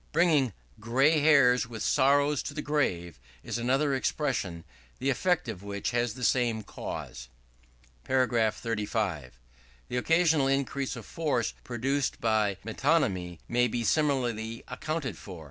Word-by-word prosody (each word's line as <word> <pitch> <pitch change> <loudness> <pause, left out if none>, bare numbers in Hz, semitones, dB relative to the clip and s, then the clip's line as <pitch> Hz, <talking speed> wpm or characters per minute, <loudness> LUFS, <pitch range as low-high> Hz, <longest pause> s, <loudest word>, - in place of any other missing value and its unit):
Bringing 150 - +3 0.3
"gray 135 +8 +3
hairs 140 -5 +5
with 115 -2 -5
sorrow 145 +2 +3
to 145 - -4
the 150 - -3
grave," 85 - -1 0.2
is - - -3
another 135 +4 +1
expression, 125 - -1 0.3
the 135 +1 0
effect 170 +2 +1
of 105 -5 -5
which 100 +1 -3
has 120 -2 0
the 125 - -7
same 120 -3 +1
cause. - - -7 0.8
§ 120 -4 +2
35. 105 - -3 0.5
The 125 - -2
occasional 160 0 +3
increase 135 0 -1
of 115 - -9
force 145 -8 -1
produced 130 +3 -1
by 110 -3 +1
Metonymy 110 - 0
may 125 +1 +2
be 120 0 -2
similarly 120 -4 0
accounted 130 - -4
for. 90 -4 -9
125 Hz, 130 wpm, -28 LUFS, 110-140 Hz, 0.8 s, hairs